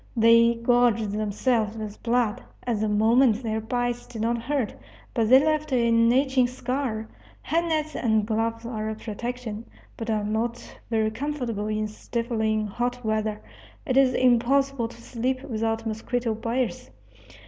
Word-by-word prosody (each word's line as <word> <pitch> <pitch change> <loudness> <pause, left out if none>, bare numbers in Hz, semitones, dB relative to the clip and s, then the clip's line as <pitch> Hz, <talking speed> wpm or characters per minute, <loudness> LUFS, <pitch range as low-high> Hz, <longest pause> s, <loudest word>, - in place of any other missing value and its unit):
They 230 +1 +6
gorged 235 -2 +2
themselves 215 +1 0
with 215 -1 -7
blood. 235 -2 +1 0.2
At 235 -4 0
the 215 0 0
moment 225 +3 +3
their 220 -1 -1
bites 245 +1 -2
did 220 -2 -5
not 235 +1 +1
hurt, 260 -2 -1 0.4
but 225 -3 +1
they 260 - +9
left 310 -1 0
an 230 -2 +4
itching 265 -1 +3
scar. 250 -3 -3 0.4
Head 335 +2 +1
nets 310 -2 -1
and 220 -3 +1
gloves 230 +1 -1
are 220 -2 -3
a 220 - -3
protection, 230 0 -5 0.3
but 225 0 -5
are 215 -1 0
not 230 +3 -3
very 220 -1 +1
comfortable 240 -5 -3
in 215 0 -1
stifling 220 0 -2
hot 245 +3 -3
weather. 215 -1 -1 0.4
It 260 -5 -1
is 265 -1 +4
impossible 255 +1 +2
to 235 - -14
sleep 255 +3 -2
without 225 -1 -2
mosquito 225 +1 -2
biers. 230 +2 -2
230 Hz, 150 wpm, -25 LUFS, 220-250 Hz, 0.4 s, they